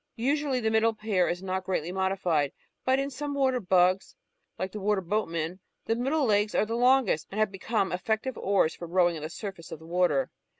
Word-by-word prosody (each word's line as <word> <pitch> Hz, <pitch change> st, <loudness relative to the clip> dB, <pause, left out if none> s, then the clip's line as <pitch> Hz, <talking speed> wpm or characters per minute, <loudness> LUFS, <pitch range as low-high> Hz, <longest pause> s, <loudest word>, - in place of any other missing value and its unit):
Usually 275 Hz, +2 st, 0 dB
the 220 Hz, -2 st, 0 dB
middle 225 Hz, 0 st, +3 dB
pair 210 Hz, -4 st, +1 dB
is 175 Hz, +2 st, -3 dB
not 190 Hz, 0 st, -2 dB
greatly 180 Hz, -3 st, -2 dB
modified, 185 Hz, -6 st, 0 dB, 0.3 s
but 260 Hz, +1 st, +3 dB
in 275 Hz, +1 st, -2 dB
some 285 Hz, +2 st, -4 dB
water 260 Hz, -2 st, +2 dB
bugs, 185 Hz, -1 st, +2 dB, 0.4 s
like 185 Hz, 0 st, -3 dB
the 210 Hz, -, -6 dB
Water 205 Hz, 0 st, +1 dB
boatman, 175 Hz, -3 st, -2 dB, 0.3 s
the 225 Hz, -, +1 dB
middle 270 Hz, +5 st, +1 dB
legs 210 Hz, -1 st, +2 dB
are -, -, +3 dB
the 225 Hz, -, -4 dB
longest 245 Hz, -, +3 dB
and 205 Hz, -, -5 dB
have 215 Hz, -2 st, +2 dB
become 195 Hz, +1 st, -1 dB
eflPective 220 Hz, +7 st, -1 dB
oars 195 Hz, -4 st, +2 dB
for 170 Hz, -, -8 dB
row 175 Hz, 0 st, +3 dB
ing 165 Hz, -, -5 dB
on -, -, -8 dB
the 155 Hz, -, -4 dB
surface 190 Hz, -2 st, -8 dB
of -, -, -5 dB
the 160 Hz, -, -15 dB
water. 165 Hz, -6 st, +1 dB
195 Hz, 210 wpm, -28 LUFS, 180-230 Hz, 0.4 s, middle